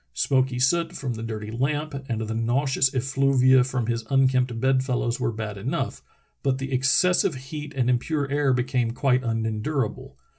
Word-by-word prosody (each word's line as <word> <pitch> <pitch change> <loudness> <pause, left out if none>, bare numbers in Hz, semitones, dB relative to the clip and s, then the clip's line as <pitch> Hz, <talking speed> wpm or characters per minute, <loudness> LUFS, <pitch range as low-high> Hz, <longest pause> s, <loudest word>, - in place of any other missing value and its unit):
Smoky 130 - +1
soot 165 +7 +1
from 135 -7 -4
the 110 - -7
dirty 110 -2 -5
lamp 145 +6 -1 0.2
and 115 -2 -2
the 110 0 -3
nauseous 130 +3 +1
effluvia 130 0 +3
from 130 -2 -2
his 115 0 -2
unkempt 130 -3 +2
bed 130 +1 +2
fellows 125 -2 -1
were - - 0
bad 110 -2 -5
enough, 135 +11 -3 0.4
but 135 -2 0
the 135 0 -5
excessive 140 +6 +3
heat 145 +3 -7
and 125 -3 +1
impure 140 +4 0
air 145 -1 +2
became 125 -2 0
quite 130 -1 +1
unendurable. 115 +3 -2
130 Hz, 160 wpm, -25 LUFS, 115-135 Hz, 0.4 s, effluvia